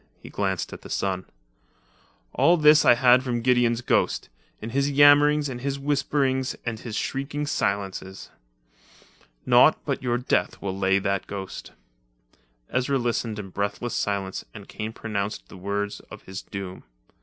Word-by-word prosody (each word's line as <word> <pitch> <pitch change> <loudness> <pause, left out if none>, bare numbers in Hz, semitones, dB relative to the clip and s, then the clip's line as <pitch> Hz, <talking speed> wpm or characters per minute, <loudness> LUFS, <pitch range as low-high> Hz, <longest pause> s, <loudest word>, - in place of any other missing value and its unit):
He - - -12
glanced 95 -3 -2
at - - -9
the - - -12
sun. 95 -1 -2 1.1
"All 175 +1 +4
this 150 -1 +6
I - - +7
had 125 +1 +5
from 120 -3 -2
Gideon's 120 -2 +2
ghost, 120 - 0 0.3
in 110 +2 -6
his 140 +2 +1
yammerings 145 +1 +5
and 125 -2 -6
his 140 +1 -2
whisperings 135 -2 0
and 115 -2 -3
his 110 -2 -7
shrieking 140 +4 -3
silences. 100 -7 -3 1.1
Naught - - +6
but - - -2
your 120 -1 0
death 125 - 0
will 95 -2 -4
lay 95 0 +2
that 100 0 -1
ghost." 95 -2 -7 1.0
Ezra 130 +2 +1
listened 115 -3 -2
in 100 -2 -6
breathless 100 +5 -3
silence 100 -2 -2
and 100 -2 -10
Kane 110 0 -5
pronounced 105 -2 -4
the - - -11
words 100 +2 -3
of - - -11
his 95 0 -7
doom. 95 -2 -7
115 Hz, 150 wpm, -25 LUFS, 100-135 Hz, 1.1 s, I